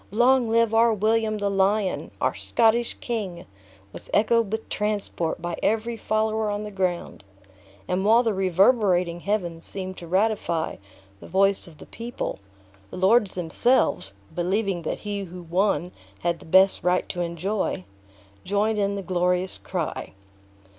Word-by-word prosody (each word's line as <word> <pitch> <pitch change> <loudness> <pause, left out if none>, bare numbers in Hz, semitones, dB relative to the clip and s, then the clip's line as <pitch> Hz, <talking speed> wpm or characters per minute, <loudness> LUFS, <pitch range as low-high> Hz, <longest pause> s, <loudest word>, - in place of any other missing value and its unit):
"Long 245 +3 +3
live 230 0 +3
our 230 +1 +5
William 215 +1 +1
the 205 -1 -1
Lion! 195 0 +1
our - - +1
Scottish 235 +1 +1
King!" 205 -8 -4 0.5
was - - -10
echoed 225 -1 +3
with 220 0 -3
transport 205 -6 -2
by 175 0 -3
every 225 +2 0
follower 220 -1 0
on 205 0 -2
the 210 - -6
ground; 185 - -2 0.6
and 185 +1 0
while 225 +4 +5
the 225 -3 +1
reverberating 185 -2 +3
heavens 175 -4 -2
seemed 185 -1 -4
to 170 - -9
ratify 185 -3 0 0.4
the - - -11
voice 195 0 +2
of 160 -3 -15
the - - -12
people, 235 +1 -5 0.5
the - - -8
lords 200 +2 +3
themselves 175 - +1 0.2
(believing 190 +1 0
that 160 - -3
he 205 -1 -4
who 180 0 -10
won 180 +1 0 0.3
had 170 -1 0
the - - -14
best 190 +3 +5
right 180 +1 +1
to 175 - -3
enjoy) 175 - -2 0.6
joined 210 +2 0
in 200 0 0
the 200 - -4
glorious 180 +1 0
cry. 175 -4 -4
195 Hz, 145 wpm, -25 LUFS, 180-220 Hz, 0.6 s, our